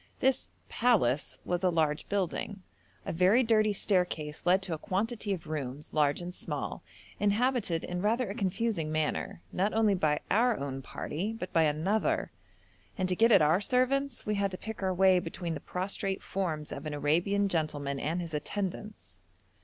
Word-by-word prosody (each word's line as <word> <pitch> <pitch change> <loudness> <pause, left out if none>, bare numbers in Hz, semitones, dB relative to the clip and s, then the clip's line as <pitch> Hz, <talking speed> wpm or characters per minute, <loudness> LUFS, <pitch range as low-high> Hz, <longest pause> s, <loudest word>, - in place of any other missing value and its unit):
This 265 0 +2 0.2
'palace' 185 - +2
was 175 +1 -1
a 185 - +4
large 155 -3 0
building; 195 0 -2 0.4
a - - -3
very 185 +9 +4
dirty 215 -2 +3
staircase 180 -6 -1
led 190 +2 +4
to 180 - -3
a 155 - -4
quantity 210 +4 -2
of 185 -4 -3
rooms, 145 -2 -5
large 150 +2 +2
and 180 +1 -6
small, - - -4 0.4
inhabited 205 -4 +1
in 180 0 -3
rather 230 +4 +1
a 195 - -4
confusing 200 -5 -1
manner, 155 - -2
not 200 +4 0
only 220 -2 +4
by 155 -5 +1
our 230 +3 +3
own 135 -1 -4
party, 180 +9 -4
but 185 -5 -6
by 165 -1 +5
another, 165 +9 0 0.7
and 185 0 0
to 180 - +2
get 230 +5 +4
at 180 - +7
our 160 +6 +4
servants 255 +3 +1
we 210 - 0
had 200 -1 +1
to 185 - -6
pick 220 +1 -7
our 190 -1 +1
way 185 0 +5
between 170 0 -4
the 150 - -4
prostrate 195 +1 -3
forms 160 -6 -3
of 145 +3 -5
an 150 - -3
Arabian 175 +8 +2
gentleman 145 -5 -1
and 165 +6 -1
his 165 -2 -6
attendants. 200 +6 -5
185 Hz, 175 wpm, -30 LUFS, 155-210 Hz, 0.7 s, at